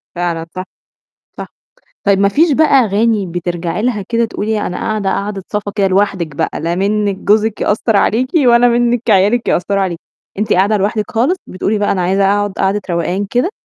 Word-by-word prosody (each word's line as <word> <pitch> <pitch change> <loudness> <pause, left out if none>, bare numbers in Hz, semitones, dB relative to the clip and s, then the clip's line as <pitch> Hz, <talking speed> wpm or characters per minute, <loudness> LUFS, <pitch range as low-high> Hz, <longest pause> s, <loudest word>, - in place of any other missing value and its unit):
فعلًا 170 -2 -2
صح. 185 - -4 0.7
صح. - - -6 0.6
طيب 200 -1 +3
ما 200 0 +3
فيش 310 - +2
بقى 315 +3 +4
أغاني 225 -5 +2
بترجعي 175 +1 -3
لها 230 -4 -1
كده 235 0 +1
تقولي 220 -1 -2
أنا 180 - -4
قاعدة، 215 -3 -2
قاعدِة 200 -1 -3
صفا 205 -1 -3
كده 200 -2 +2
لوحدِك 185 -6 0
بقى، - - -2
لا 170 +2 -1
منِك 200 +1 0
جوزِك 215 +2 +1
يأثّر 215 +1 +1
عليكِ 245 +6 +1 0.2
ولا 240 0 +5
منِك 240 -1 +1
عيالِك 205 +5 +3
يأثّروا 195 +3 0
عليكِ. 175 -3 -3 0.4
أنتِ 210 0 0
قاعدة 200 +4 +3
لوحدِك 210 +2 -1
خالص، 255 +11 +1
بتقولي 205 +3 -2
بقى: 205 - +1
"أنا 185 - -1
عايزة 195 +2 +1
أقعد 205 +1 +1
قعدة 195 +2 0
روقان 175 +4 -1
كده" 250 +10 0
205 Hz, 180 wpm, -15 LUFS, 190-225 Hz, 0.7 s, ولا